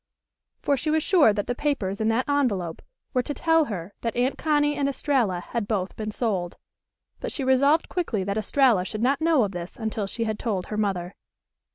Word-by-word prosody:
For 285 - +3
she 300 +5 -2
was 315 0 +2
sure 335 - +5
that 205 -1 -2
the 245 - -1
papers 225 -8 -2
in 220 - +1
that 225 +3 +1
envelope 215 - 0 0.3
were 255 - +3
to 285 +4 -5
tell 325 -1 +3
her 195 -5 -6
that 230 - -2
Aunt 250 +3 +1
Connie 295 -1 +1
and 280 -1 0
Estralla 250 -10 0
had 215 +3 -4
both 195 -4 -2
been 215 -1 -4
sold. 200 -6 -2 0.6
But - - -4
she 280 - -2
resolved 280 +5 +3
quickly 245 - -2
that 200 +1 -2
Estralla 220 -2 +3
should 215 +4 -4
not 275 +4 +2
know 320 -6 +4
of 200 - -1
this 175 -1 -7
until 220 -3 -3
she 230 +4 -3
had 220 -1 -2
told 200 -6 -2
her 210 - -5
mother. 190 -4 -1
230 Hz, 205 wpm, -25 LUFS, 200-280 Hz, 0.6 s, sure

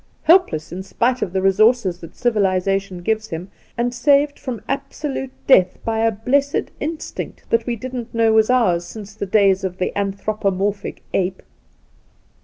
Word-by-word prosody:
Helpless 310 - +3
in 180 +2 -5
spite 240 +6 0
of 180 - -1
the 190 0 -1
resources 195 -1 +3
that 165 - -11
civilization 195 -4 0
gives 220 +2 0
him, 175 +1 -6 0.3
and 240 +1 0
saved 285 +3 +3
from 240 -6 -5
absolute 275 0 -3 0.2
death 185 -9 +5
by 225 -1 0
a 225 0 +3
blessed 275 +7 0
instinct 310 +2 -5
that 230 +1 +2
we 240 - 0
didn't 245 0 -6
know 225 -1 +3
was 220 +1 +4
ours 215 -9 +3
since 205 +2 -9
the 200 -1 -5
days 195 -1 +3
of 185 -1 -3
the 185 - -2
anthropomorphic 200 0 -2
ape 185 0 -1
215 Hz, 155 wpm, -20 LUFS, 190-245 Hz, 0.3 s, death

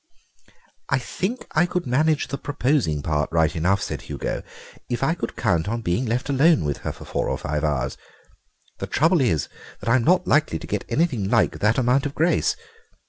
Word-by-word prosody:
"I 135 - +3
think 190 - -3
I 175 +3 +3
could 180 0 -2
manage 150 +4 +2
the 140 - -3
proposing 130 - 0
part 75 -2 -1
right 80 -1 +2
enough," 90 +5 +1
said - - -4
Hugo, - - -4 0.5
"if 120 +2 -2
I 160 - +3
could 170 - -5
count 95 -5 0
on 115 +2 -2
being 110 +8 0
left 120 +3 -1
alone 145 - +4
with 70 -1 -1
her - - -4
for - - -12
four - - -2
or - - -1
five 75 +1 -3
hours. 70 -4 -1 0.8
The - - -4
trouble 165 +1 +3
is 95 - +1 0.3
that - - -4
I'm 120 0 +4
not 180 +4 +3
likely 145 - +2
to - - -9
get - - -3
anything 130 - 0
like 115 -2 +2
that 105 +2 +2
amount 130 +2 +2
of 140 - -9
grace. 175 - +2
125 Hz, 195 wpm, -23 LUFS, -, 0.8 s, alone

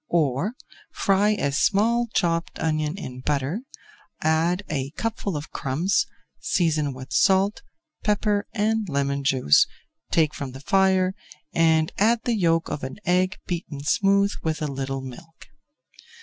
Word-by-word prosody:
Or, 160 - +1 0.4
fry 200 +1 +2
a 140 -9 -1
small 220 +10 +2
chopped 170 -4 0
onion 155 +1 -1
in 130 -9 -7
butter, 145 - -1 0.6
add 165 +4 +1
a 135 -3 -2
cupful 215 -6 -2
of 145 - -7
crumbs, 160 +9 0 0.3
season 155 -6 +1
with 130 +1 -8
salt, 195 +1 +3 0.4
pepper 210 -1 +1
and 220 -1 0
lemon 140 -1 -1
juice, 130 - +4 0.4
take 155 -2 +2
from 135 -3 -6
the 135 - -8
fire 190 +2 +3 0.4
and 160 -1 +3
add 225 +3 +3
the 240 - +1
yolk 165 -4 +2
of 145 - -5
an 130 +5 -5
egg 185 +2 +2
beaten 165 -5 -5
smooth 200 +5 +3
with 160 -1 -2
a - - 0
little 135 0 -3
milk. 160 +6 -11
165 Hz, 135 wpm, -24 LUFS, 140-200 Hz, 0.6 s, juice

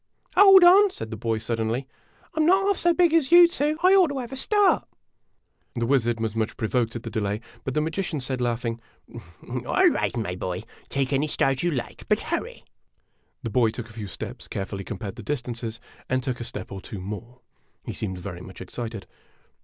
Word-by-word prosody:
" - - -32
Hold 390 -2 +9
on," 390 +4 +8
said 110 - -7
the - - -3
boy, 115 0 -1
suddenly; 115 +3 -2 0.2
" - - -32
I - - -21
'm 310 - +4
not 385 +2 +4
half 400 -2 +2
so 345 - +4
big 340 -1 +3
as 320 -3 +3
you 345 0 +9
two 305 -2 0
I 370 +1 +7
ought 380 -3 +6
to 285 -2 -4
have 250 -2 -5
a - - -5
start! 410 +9 +2 0.9
The 120 -1 0
wizard 120 -3 +1
was 110 -1 -2
much 110 -1 -2
provoked 115 0 0
at 120 - -5
the 115 - -6
delay, 105 -1 -1 0.2
but 130 - -4
the 150 - +2
magician 160 0 -2
said, 130 -1 -3
laughing: 115 -1 -2 0.7
"All - - +2
right, - - -1
my 100 -6 -2
boy; 90 0 -4 0.3
take 135 0 -1
any 140 +3 +1
start 135 -3 +1
you 175 - +1
like, 125 -7 -5
but - - +3
hurry." - - -4 0.8
The 115 - -3
boy 115 0 +3
took 115 0 -7
a - - -14
few 110 -2 -6
steps, - - -7
carefully 95 0 -4
compared 100 -1 -6
the - - -7
distances, 120 -5 -4 0.3
and 130 0 0
took 125 -1 -3
a - - -4
step - - -6
or 95 -1 -6
two 105 - -8
more. 110 +6 -8 0.4
He - - -4
seemed 95 -4 -4
very 90 0 -7
much 95 0 -11
excited. 110 +2 -6
120 Hz, 210 wpm, -25 LUFS, -, 0.9 s, Hold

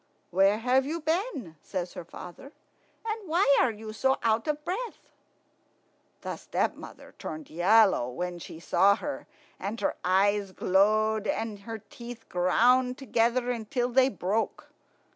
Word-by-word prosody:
"Where 195 +3 +4
have 255 +4 +2
you 315 +5 -3
been?" 315 - -2
says 180 -2 -4
her - - -7
father; 180 - -11 0.5
"and 435 -4 -4
why 325 -4 +4
are 260 - +4
you 215 0 -7
so 265 +4 +2
out 225 +2 +1
of 300 0 -2
breath?" 440 +7 -5 1.1
The - - -5
stepmother - - -4
turned 310 -3 -7
yellow 190 - +4
when 175 +7 -4
she 160 - -9
saw 195 +4 +4
her, 290 +6 -6 0.3
and 210 +4 -4
her - - 0
eyes 195 +1 +2
glowed, 215 +3 +2
and 215 0 -2
her 225 +3 -6
teeth 240 -1 -9
ground 250 +8 +3
together 240 0 +1
until 240 +1 -2
they 260 +1 +4
broke. 205 +1 -2
225 Hz, 140 wpm, -28 LUFS, 195-265 Hz, 1.1 s, Where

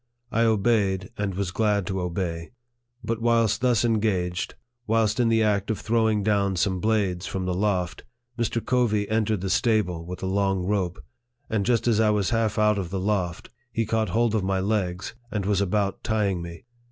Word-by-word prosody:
I 115 0 +2
obeyed, 100 -4 +1
and 100 -2 -2
was 95 -1 -2
glad 105 -1 +1
to 95 +1 -2
obey. 85 +1 -3 0.5
But 115 +1 -2
whilst 115 -1 +2
thus 120 -3 +3
engaged, 100 -6 0 0.3
whilst 110 0 +2
in 120 -2 +3
the 115 -1 +3
act 100 -1 +1
of 110 - -1
throwing 110 -2 +1
down 100 -2 +1
some 95 +1 0
blades 100 -4 0
from 95 -1 -3
the 90 - -1
loft, 90 -2 -1 0.3
Mr. 115 -1 -1
Covey 110 -5 +1
entered 110 -2 +1
the 95 - -2
stable 100 -6 +1
with 90 +2 -7
a - - 0
long 95 -1 +1
rope; 95 -2 -2 0.5
and 110 -2 0
just 120 -1 +2
as 110 -2 +3
I 110 -1 +4
was 105 -1 +1
half 115 -2 +1
out 105 -1 +3
of 90 -3 -4
the 95 +1 -3
loft, 95 -3 -2 0.2
he 115 0 0
caught 110 -1 0
hold 115 +4 +1
of 110 -3 +1
my 95 0 0
legs, 95 -2 -1 0.2
and 105 -4 -2
was 100 -1 +1
about 100 0 0
tying 105 -5 0
me. 85 +4 -9
105 Hz, 190 wpm, -25 LUFS, 95-110 Hz, 0.5 s, I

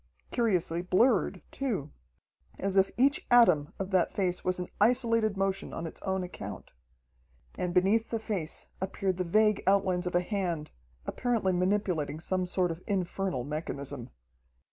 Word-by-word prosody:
Curiously 180 -7 +1
blurred, 190 - +2
too, 205 - -3 0.7
as 195 0 0
if 195 0 +4
each 275 +4 +3
atom 180 -12 +5
of 195 0 -4
that 185 -2 +2
face 180 -3 -1
was 185 0 +1
in 180 0 -4
isolated 230 -2 +3
motion 195 0 -1
on 165 - -4
its 165 - -8
own 190 -1 -1
account. 180 -1 -8 0.8
And 180 - -2
beneath 195 +5 +2
the 230 - -1
face 200 -8 -2 0.2
appeared 190 -1 -1
the 185 - 0
vague 210 +3 +3
outlines 190 -2 +2
of 180 - -3
a 175 - +4
hand, 175 -6 -2 0.3
apparently 230 -7 0
manipulating 180 -5 0
some 185 +2 -1
sort 180 -1 +1
of 165 +2 -7
infernal 190 - -1
mechanism. 140 -3 -5
185 Hz, 145 wpm, -29 LUFS, 175-210 Hz, 0.8 s, atom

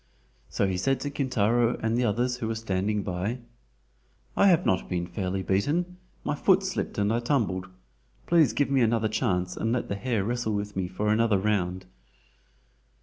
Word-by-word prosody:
So - - 0
he 95 -2 -1
said 135 +9 +1
to 145 - -3
Kintaro 120 -3 +1
and 115 0 -1
the 125 +1 +1
others 120 +3 0
who 120 -3 -3
were 115 - -2
standing 105 -1 -1
by: 95 +6 -2 1.0
"I 200 - +5
have 175 -4 +4
not 95 - +1
been 90 -1 -1
fairly 95 +2 -3
beaten. 160 - 0 0.3
My - - -1
foot 190 +6 +3
slipped 190 -1 -3
and 105 +1 +1
I 115 - +1
tumbled. 115 -8 0 0.6
Please 165 -7 +4
give 145 -1 0
me 135 -2 +3
another 115 -1 +2
chance 95 -5 -1
and 115 - -1
let 125 0 -1
the 100 - -1
hare 115 -1 -1
wrestle 120 0 -1
with 100 0 -4
me 95 -1 -1
for 100 +4 -2
another 110 -1 +3
round." 95 -2 -1
110 Hz, 180 wpm, -27 LUFS, 95-125 Hz, 1.0 s, I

